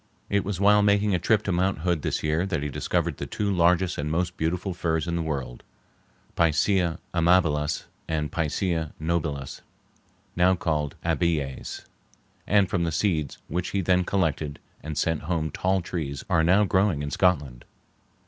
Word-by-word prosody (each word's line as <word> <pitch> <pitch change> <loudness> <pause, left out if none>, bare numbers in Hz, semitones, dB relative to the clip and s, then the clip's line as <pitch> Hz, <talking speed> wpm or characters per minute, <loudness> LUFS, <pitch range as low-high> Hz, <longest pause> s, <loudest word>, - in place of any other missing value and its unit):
It 100 0 +2
was 100 -2 -3
while 105 +1 +5
making 100 0 +3
a 90 - +2
trip 105 +4 +2
to 100 - -1
Mount 90 -1 0
Hood 85 -2 0
this - - -2
year 80 +4 +1
that 90 -7 -2
he 75 - -2
discovered - - -1
the - - -5
two 105 -1 -1
largest 90 -1 +2
and 75 +1 -2
most 90 +3 -1
beautiful 90 +4 -2
firs 80 -2 -1
in 85 - -1
the 85 - 0
world 70 -6 -4 0.7
(Picea 85 +1 +2 0.2
amabilis 85 -4 +2 0.2
and 75 -2 -2
P. 85 - -1 0.6
nobilis—now 85 +3 -3
called 75 -5 -1
Abies), 75 -6 -1 0.6
and 100 -1 +4
from 90 -1 0
the 85 - 0
seeds 80 -5 0
which 90 +3 -2
he - - +2
then 90 0 +2
collected 80 -6 -1 0.2
and 75 0 -6
sent 80 -2 0
home 80 -1 -2
tall 95 +1 0
trees 75 -6 -4
are 80 - +3
now 95 +5 +5
growing 95 -6 +1
in 70 - -4
Scotland. 75 -10 +1
85 Hz, 160 wpm, -26 LUFS, 75-95 Hz, 0.7 s, while